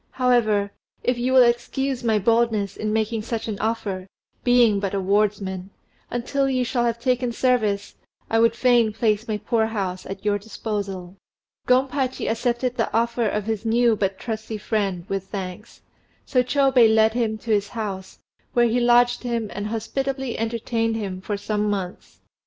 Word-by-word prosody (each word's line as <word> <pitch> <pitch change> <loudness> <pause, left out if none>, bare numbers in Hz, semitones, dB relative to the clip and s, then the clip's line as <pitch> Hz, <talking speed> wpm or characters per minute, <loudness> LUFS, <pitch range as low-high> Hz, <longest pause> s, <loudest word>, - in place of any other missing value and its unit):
"However, 220 -6 +2 0.3
if 250 -1 0
you 250 +2 0
will 260 -1 +7
excuse 245 +2 0
my 225 -2 +2
boldness 220 -2 +1
in 215 0 -2
making 220 +1 0
such 225 +1 -4
an 210 -3 -4
offer, 205 -4 -2 0.4
being 240 -4 +4
but 195 0 -2
a - - +1
wardsman, 195 -1 0 0.4
until 270 +3 -1
you 255 -1 +1
shall 240 0 0
have 235 0 -1
taken 250 0 0
service 225 -5 0 0.3
I 225 - +2
would 230 0 +4
fain 240 -3 +3
place 215 0 0
my 215 -1 -1
poor 220 +1 0
house 190 -4 -4
at 195 +1 -7
your 205 -1 +2
disposal." 200 -3 -5 0.5
Gompachi 260 +1 +1
accepted 245 +2 -1
the 225 - 0
offer 235 0 +1
of 210 -1 -2
his 220 -1 -2
new 230 0 +3
but 195 -2 -1
trusty 220 -1 -5
friend 200 -5 -2
with 195 -1 -3
thanks; 195 +1 -7 0.4
so 255 - +2
Chôbei 255 -3 +4
led 220 0 +4
him 225 -2 0
to 225 +1 -5
his 205 -1 +2
house, 200 -4 -5 0.4
where 240 -1 +4
he 235 +2 +1
lodged 245 0 +4
him 235 -3 -2
and 205 0 -4
hospitably 265 +3 -3
entertained 225 0 -1
him 195 -4 -4
for 205 +1 -3
some 210 +1 -1
months. 190 -3 -5
225 Hz, 165 wpm, -23 LUFS, 205-240 Hz, 0.5 s, will